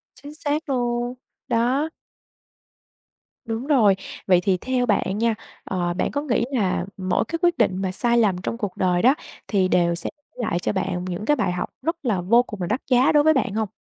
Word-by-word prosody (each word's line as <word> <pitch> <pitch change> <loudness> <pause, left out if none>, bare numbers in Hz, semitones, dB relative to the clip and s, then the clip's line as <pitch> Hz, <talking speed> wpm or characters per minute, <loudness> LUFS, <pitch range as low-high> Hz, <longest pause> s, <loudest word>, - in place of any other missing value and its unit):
Chính 285 +3 -11
xác 305 0 -2
luôn, 240 -1 -1 0.3
đó. 255 +7 +1 1.6
Đúng 230 +4 -4
rồi. 220 -10 +5 0.3
Vậy 180 -2 +5
thì 190 -1 +2
theo 250 +3 0
bạn 205 -2 +1
nha, 230 0 +1 0.3
ờ, 175 -2 -1
bạn - - -1
có 285 - -1
nghĩ 240 -5 0
là 190 -8 0
mỗi 185 +3 0
cái 330 +4 -3
quyết 345 -1 +3
định 185 +1 +1
mà 190 -1 -1
sai 235 +5 +1
lầm 205 -6 +3
trong 230 - -3
cuộc 205 -5 -4
đời 180 -1 +2
đó 260 +4 +5 0.3
thì 190 -3 +2
đều 170 -1 +2
sẽ - - -4 0.3
lại 215 -8 -1
cho - - -1
bạn 180 -1 -2
những 185 +3 -4
cái 295 - +3
bài 200 -8 0
học 180 - -3
rất 330 +4 -1
là 200 -6 +1
vô 235 +7 +4
cùng 210 -6 -8
là 175 - -1
đắt 230 +6 -1
giá 250 +2 +5
đối 295 -1 +5
với 315 0 +5
bạn 255 -7 0
hông? 220 -1 0
225 Hz, 210 wpm, -23 LUFS, 185-255 Hz, 1.6 s, rồi